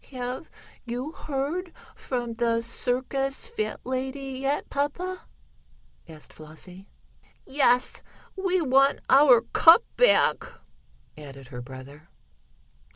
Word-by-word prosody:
"Have 255 +3 -6 0.3
you 250 +5 -5
heard 310 +5 -4 0.2
from 240 -3 -4
the 230 0 0
circus 265 - -2
fat 465 -2 -4
lady 265 +1 -4
yet, 275 +2 -1
papa?" 355 +6 -3 0.8
asked 155 -2 -11
Flossie. 180 +5 -11 0.6
"Yes, 255 -3 +2 0.3
we 370 -2 0
want 275 -1 +3
our 265 -3 +7
cup 335 +8 +7
back," - - +4 0.7
added 135 -4 -12
her 125 -2 -7
brother. 135 +5 -12
260 Hz, 95 wpm, -26 LUFS, 230-290 Hz, 0.8 s, our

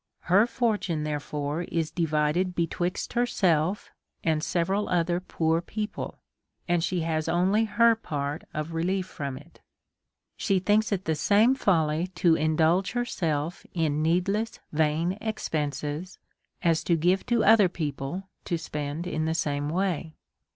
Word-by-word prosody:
Her 200 +6 +4
fortune, 210 -10 0
therefore, 150 +1 -3
is 165 -2 -2
divided 165 +2 0
betwixt 175 +2 -2
herself 190 -7 +1 0.3
and 155 -2 +1
several 190 +4 0
other 175 0 +1
poor 165 -2 0
peo 210 +4 -3
ple, 210 - -7 0.5
and 175 -1 +2
she 180 -1 0
has 160 -1 -1
only 190 +6 +3
her 230 +2 +4
part 145 -8 -4
of 155 +2 -4
relief 180 +3 0
from 140 -7 -5
it. - - -16 0.7
She 195 - +1
thinks 210 +4 +2
it 195 -2 0
tlie 160 -2 0
same 210 - +4
folly 165 - +1
to 175 -2 +4
indulge 160 +4 +2
herself 170 -10 -2
in 155 -3 +1
needless 195 +7 0
vain 160 +5 +1
expenses, 150 -5 -3 0.5
as 165 -2 +2
to 170 - +3
give 180 +4 +2
to 235 -2 +2
other 210 -3 +6
people 155 +3 -4 0.2
to 170 - -1
spend 150 0 -4
in 155 -3 -2
the 160 0 0
same 145 -2 -1
way. 170 -2 -1
170 Hz, 140 wpm, -27 LUFS, 155-190 Hz, 0.7 s, other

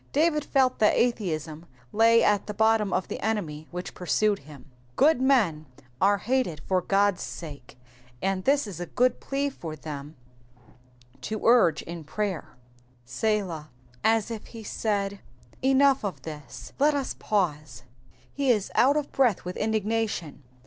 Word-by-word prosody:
David 300 0 +2
felt 265 -3 +2
that 215 - +4
atheism 170 -9 -1 0.3
lay 230 +1 +5
at 205 -1 +2
the 210 - -5
bottom 220 -1 +3
of 185 - 0
the - - -5
enmity 170 -9 -3
which 180 +1 -6
pursued 205 +3 +1
him. 140 -2 -14 0.3
Good 290 - +4
men 205 - +2 0.3
are 200 +1 +4
hated 235 - -1
for 185 -1 +2
God's 195 0 +2
sake, 140 -7 -8 0.4
and 190 +2 -1
this 280 +3 +3
is 195 -5 -8
a 175 - -4
good 250 +1 +1
plea 280 +1 -2
for 160 -11 -7
them 150 0 -8 1.1
to 215 -1 -4
urge 225 -10 +5
in 170 -1 -7
prayer. 180 +2 -4 0.2
' 125 0 -34
^Selah, 180 - -1 0.2
" 125 0 -29
As 225 0 +2
if 220 -2 -6
he 230 -2 -10
said, 200 -2 -2 0.2
*' 120 - -28
Enough 270 -1 +4
of 170 -10 -4
this, 150 -3 -9
let 295 +1 +4
us 275 -2 -2
pause." 150 - -1 0.5
He 280 -2 0
is 210 -5 +2
out 280 +4 +4
of 295 -2 -2
breath 245 -10 +2
with 180 - -5
indignation. 215 -7 -1
205 Hz, 155 wpm, -26 LUFS, 160-230 Hz, 1.1 s, lay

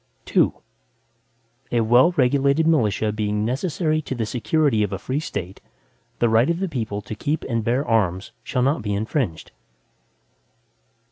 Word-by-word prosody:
II - - +5 1.2
A 120 - +2
well 120 +9 +5
regulated 140 +1 +2
militia, 110 -9 +2
being 105 0 -1
necessary 155 +5 -1
to 135 - -5
the 115 -2 -2
security 125 +1 +1
of 105 -1 0
a 95 - -2
free 130 +8 -3
State, 95 - -6 0.6
the 120 - +2
right 115 +5 +3
of 170 0 0
the 195 - -1
people 110 - -4
to 100 - -6
keep 145 +8 -2
and 115 -3 -2
bear 125 +6 0
arms, 95 -5 0
shall 125 - -1
not 140 +2 +1
be 105 -1 -2
infringed. 110 - -2
120 Hz, 150 wpm, -22 LUFS, 105-145 Hz, 1.2 s, II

